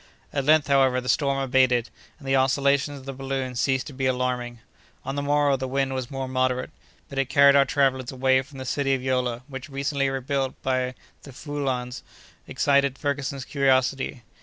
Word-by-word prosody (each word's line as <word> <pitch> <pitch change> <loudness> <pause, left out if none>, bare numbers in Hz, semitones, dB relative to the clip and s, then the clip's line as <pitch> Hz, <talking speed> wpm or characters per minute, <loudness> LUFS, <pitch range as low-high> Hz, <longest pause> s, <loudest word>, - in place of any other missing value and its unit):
At 140 -2 -1
length, 155 0 +5
however, 135 -2 +3
the 125 - -8
storm 135 +2 +1
abated, 130 -3 +2 0.3
and 140 - -12
the 135 - +2
oscillations 140 +2 +2
of 130 - -12
the 135 - -5
balloon 135 -1 -3
ceased 130 +2 0
to 145 - -9
be 130 0 -1
alarming. 125 -1 -1 0.5
On 135 - -3
the 140 - -2
morrow 145 -1 +2
the 130 0 -4
wind 135 0 -1
was 130 -2 -4
more 135 -1 -4
moderate, 130 0 -1 0.4
but 140 - -5
it 135 -1 0
carried 140 0 +6
our 140 -1 +6
travellers 130 -3 +1
away 130 0 +2
from 135 +1 -14
the 130 - -6
city 135 +1 0
of 130 - -6
Yola, 125 -2 -1
which 135 +1 -8
recently 140 0 -1
rebuilt 135 0 -2
by 130 -1 -1 0.3
the 140 - -12
Fouillans, 130 -3 -4 0.5
excited 140 -1 +2
Ferguson's 140 -2 -3
curiosity. 130 -2 +1
135 Hz, 185 wpm, -25 LUFS, 130-140 Hz, 0.5 s, carried